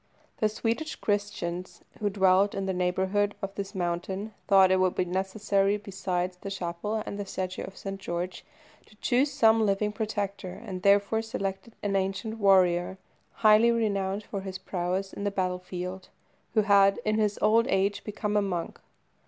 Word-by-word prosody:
The 215 - +2
Swedish 230 +8 -2
Christians 200 -4 -3 0.2
who 210 - +1
dwelt 195 0 +3
in 195 -1 -2
the 190 - -1
neighbourhood 190 +3 0
of 195 -1 -5
this 200 -1 -6
mountain 190 +4 -3
thought 195 -2 +6
it 190 - +4
would 185 -1 +2
be 180 - +1
necessary, 195 +2 0
besides 185 -3 -3
the 195 - -7
chapel 195 +3 -3
and 200 0 -5
statue 185 -1 -3
of 190 - -11
St. 195 0 -6
George, 175 +1 -4 0.4
to 215 - -20
choose 260 +6 +1
some 225 -4 +4
living 210 0 +1
protector, 205 -3 -3
and 185 -3 -5
therefore 200 +3 +3
selected 220 0 -5
an 200 -1 0
ancient 195 +4 -2
warrior, 185 -2 +4 0.5
highly 215 +2 +7
renowned 205 -3 0
for 200 -1 -5
his 190 -1 -5
prowess 185 +1 -3
in 200 - -6
the 205 - +1
battle 185 -2 -1
field, 180 +1 -6 0.5
who 215 - +6
had, 200 -1 +5
in 215 0 +1
his 210 -1 +1
old 225 +2 +4
age, 195 +1 +1
become 210 0 -3
a 210 - +4
monk. 180 -4 -3
195 Hz, 165 wpm, -28 LUFS, 185-210 Hz, 0.5 s, highly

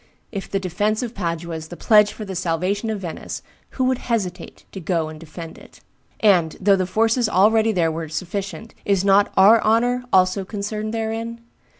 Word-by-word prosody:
If 195 -3 -6
the 195 - -1
defence 205 +5 -1
of 240 -1 -5
Padua 170 -3 -3
is 160 0 -8
the 175 - -10
pledge 210 -2 +5
for 215 - -8
the 190 -1 -6
salvation 185 +5 -1
of 215 -3 -3
Venice, 170 -3 -6 0.3
who 260 - +1
would 255 0 +1
hesitate 185 -7 -4
to 195 - -7
go 165 -2 -1
and 155 0 -10
defend 165 +1 -9
it? - - -17 0.4
And, 180 -7 +3
though 200 +1 +4
the 185 -1 -1
forces 225 +3 +2
already 220 +4 +4
there 170 -5 +1
were 160 0 -5
sufficient, 195 +7 -5
is 195 -1 +1
not 200 +1 +4
our 210 +4 +7
honor 245 +3 +2
also 185 +1 +3
concerned 210 +2 -4
therein? 225 +1 -4
200 Hz, 185 wpm, -22 LUFS, 175-220 Hz, 0.4 s, our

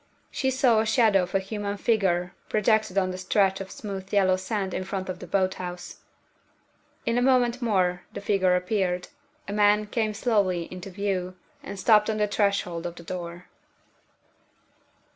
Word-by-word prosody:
She 265 - 0
saw 255 -4 +3
the 220 - +1
shadow 220 -4 +4
of 180 +1 -4
a - - +4
human 205 +1 -4
figure 190 -6 +1 0.2
projected 215 -2 +2
on 185 -1 +2
the 185 - -6
stretch 195 +1 +1
of 190 - -7
smooth 195 -2 -7
yellow 190 -2 +4
sand 190 0 -3
in - - -2
front 190 0 -4
of 185 - -4
the 180 - -9
boat 190 +1 +1
house. 180 0 -7 1.1
In 230 +1 +1
a - - 0
moment 250 -1 +3
more 185 -6 +1
the - - -6
figure 190 -3 +2
appeared. 180 -1 -1 0.4
A 200 - -4
man 210 0 +4
came 215 0 -1
slowly 200 -7 +1
into 185 +2 -7
view, 185 -1 -2 0.3
and 200 - -7
stopped 210 +1 +4
on 215 - 0
the 210 - +2
threshold 200 -5 0
of 170 - -8
the 170 - -11
door. 175 0 -6
195 Hz, 170 wpm, -26 LUFS, 185-215 Hz, 1.1 s, shadow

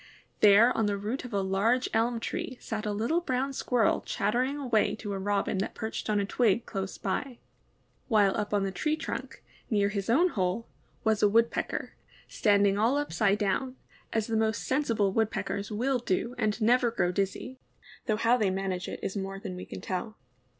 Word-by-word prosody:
There 210 +4 +6
on 220 -2 +1
the 200 -1 0
root 220 +7 -4
of 250 - -8
a 200 -2 0
large 215 +7 +1
elm 230 +1 +1
tree 250 +2 -4
sat 215 -1 -4
a - - 0
little 230 +12 0
brown 270 -3 -1
Squirrel 245 -4 +1
chattering 250 +7 0
away 245 -7 +1
to 210 -2 -5
a 195 - -3
Robin 200 0 0
that 195 - -3
perched 220 -1 -4
on 210 -1 +2
a 200 - 0
twig 230 +1 +1
close 195 -2 -4
by, 240 +6 -3 0.7
while 205 -5 +3
up 210 -2 -2
on 205 -1 +2
the 195 - -1
tree 305 - 0
trunk, 315 +1 -6 0.3
near 205 -2 +2
his 200 0 -3
own 330 +10 +4
hole, 190 - -1 0.4
was 220 -2 +2
a 210 - +5
Woodpecker, 230 +2 0 0.3
standing 200 -1 +3
all 235 +6 +3
upside 215 -8 +1
down, 255 +5 -1 0.4
as 220 -1 0
the 225 - -2
most 220 0 +1
sensible 230 -8 +1
Woodpeckers 210 -2 -1
will 250 +5 0
do 235 +1 -1
and 215 -2 -1
never 240 +2 +4
grow 185 -6 0
dizzy, 200 +7 -3 0.5
though 215 -2 +1
how 230 +2 +3
they 210 -5 +2
manage 190 -1 -2
it - - -6
is 190 - -3
more 195 0 -4
than 185 -2 -6
we 180 - -7
can - - -8
tell. 200 +4 -4
215 Hz, 190 wpm, -29 LUFS, 200-240 Hz, 0.7 s, There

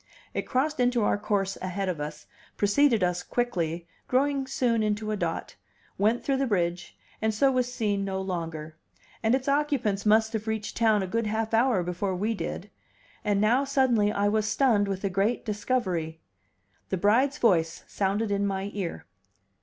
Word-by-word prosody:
It - - -3
crossed 290 +3 0
into 245 -2 +2
our 205 - +1
course 195 -2 -1
ahead 185 +1 -2
of 170 -5 -2
us, 150 0 -6 0.3
preceded 225 +1 +3
us 180 0 0
quickly, 175 -9 -2 0.2
growing 275 +1 +1
soon 240 -3 +1
into 215 0 -1
a - - 0
dot, 205 - -3 0.4
went 220 +4 +1
through 275 -1 +1
the 270 0 0
bridge, 175 -4 -1 0.2
and 220 0 +2
so 270 +6 +3
was 250 -1 0
seen 205 -5 -1
no 190 -1 -2
longer; 165 -4 -4 0.5
and 225 +2 +3
its 265 0 -3
occupants 275 -9 +1
must 220 +1 +3
have 220 0 -3
reached 220 -1 -3
town 220 -3 +3
a - - -3
good 230 +3 -1
half 220 +1 -2
hour 230 -4 +3
before 180 +2 -2
we 210 +5 0
did. 215 - -5 0.5
And 205 -2 +1
now, 235 +6 +3
suddenly, 260 -7 +2
I 205 0 +1
was 215 +1 +1
stunned 220 -4 +3
with 195 0 -3
a 200 - +1
great 200 +6 0
discovery. 190 -8 -1 0.7
The 190 - 0
bride's 245 +9 +3
voice 170 - +2
sounded 205 +2 -1
in 200 0 +1
my 195 +1 -3
ear. 180 - -4
210 Hz, 175 wpm, -27 LUFS, 190-240 Hz, 0.7 s, preceded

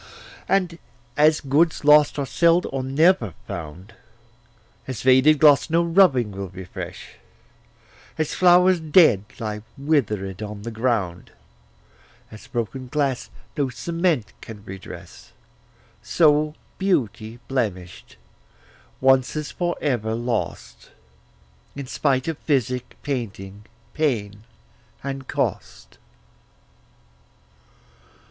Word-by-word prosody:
And 180 -4 +1 0.4
as 155 +1 +4
goods 150 +3 +1
lost 150 0 +6
are 140 - -1
seld 170 +4 +3
or 135 - -2
never 135 - +2
found, 85 +6 -8 0.9
As 130 -3 -5
vaded 130 +4 +5
gloss 145 -1 +5
no 165 +2 +2
rubbing 165 - +3
will 100 -1 -6
refresh, 95 -1 -9 1.0
As 155 -1 -1
flowers 180 0 +5
dead 155 - +4
lie 105 -1 -4 0.2
wither'd 110 - -1
on 105 -1 -7
the 115 - -5
ground, 110 -7 -2 1.0
As 110 +1 -12
broken 120 +2 -4
glass 135 -2 -1 0.3
no 140 -4 0
cement 165 - -1
can 105 -2 -11
redress, 95 -1 -11 0.7
So 150 -2 +2 0.2
beauty 120 - -1
blemish'd 95 -10 -4 0.9
once's 135 +3 +2
for 175 -1 -2
ever 115 -6 -1
lost, 120 -1 -4 0.9
In 140 -1 -6
spite 130 0 0
of 165 -3 -3
physic, 125 -4 -1
painting, 105 -7 -5 0.3
pain 110 -9 -2 0.6
and 135 -1 -5
cost. - - -4
130 Hz, 100 wpm, -23 LUFS, 110-155 Hz, 1.0 s, lost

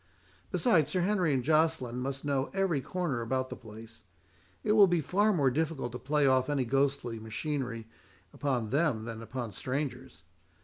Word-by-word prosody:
Besides, 175 - +3
Sir 185 - 0
Henry 185 -3 +2
and 130 -3 +1
Joceline 155 -5 +1
must 135 +2 -4
know 140 -1 0
every 190 -7 +1
corner 160 -7 -2
about 130 +3 -2
the - - -4
place: 110 -1 -12 0.6
it 210 - +1
will 210 -2 +7
be 175 -1 +2
far 200 +8 +2
more 140 -9 +2
difficult 150 -3 -1
to 125 - -6
play 145 +1 +1
off 130 0 +3
any 140 -3 +1
ghostly 135 -2 0
machinery 115 0 -4 0.5
upon 125 -6 -1
him 140 -6 +1
than 115 -1 -6
upon 120 -1 -5
strangers. 130 - -4
135 Hz, 165 wpm, -30 LUFS, 125-160 Hz, 0.6 s, will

